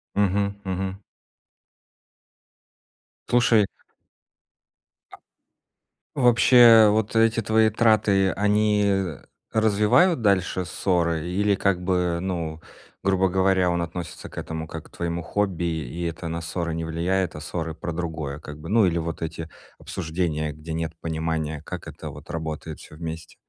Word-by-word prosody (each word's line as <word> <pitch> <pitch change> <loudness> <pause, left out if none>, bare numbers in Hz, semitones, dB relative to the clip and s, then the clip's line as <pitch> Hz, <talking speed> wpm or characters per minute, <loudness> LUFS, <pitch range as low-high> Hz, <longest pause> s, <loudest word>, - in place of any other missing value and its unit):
Мгм 100 0 +1
мгм. 95 0 -3 2.3
Слушай 120 -4 +4 2.3
А 140 - -10
вообще, 120 -2 +7
вот 110 +1 0
эти 115 0 +4
твои 110 +1 +3
траты, 105 -4 +3
они 105 0 +2 0.6
развивают 110 - +3
дальше 95 -3 +1
ссоры 85 -3 0
или, 100 +2 +1
как 95 -2 0
бы, 90 -2 0
ну, 85 -4 -3 0.4
грубо 95 -1 +2
говоря, 95 -1 +2
он 85 0 0
относится 85 -1 -6
к - - -15
этому 80 0 -5
как 80 0 -8
к - - -19
твоему 85 0 -2
хобби, 90 0 -1
и 80 +1 -3
это 85 0 -4
на 85 +1 -3
ссоры 85 0 -3
не 80 0 -3
влияет, 85 +2 -1
а - - -7
ссоры 80 -1 -4
про 85 - -5
другое, 80 -4 -4
как 75 0 -9
бы? 80 - -9
Ну, 110 0 +4
или 85 -1 +1
вот 80 0 -4
эти 80 0 -5 0.3
обсуждения, 80 -3 -3
где 75 +2 -8
нет 80 0 -3
понимания, 80 -2 -3
как 90 0 -7
это - - -8
вот - - -12
работает 80 -1 -5
всё 75 - -13
вместе? 80 0 -7
90 Hz, 135 wpm, -24 LUFS, 80-100 Hz, 2.3 s, вообще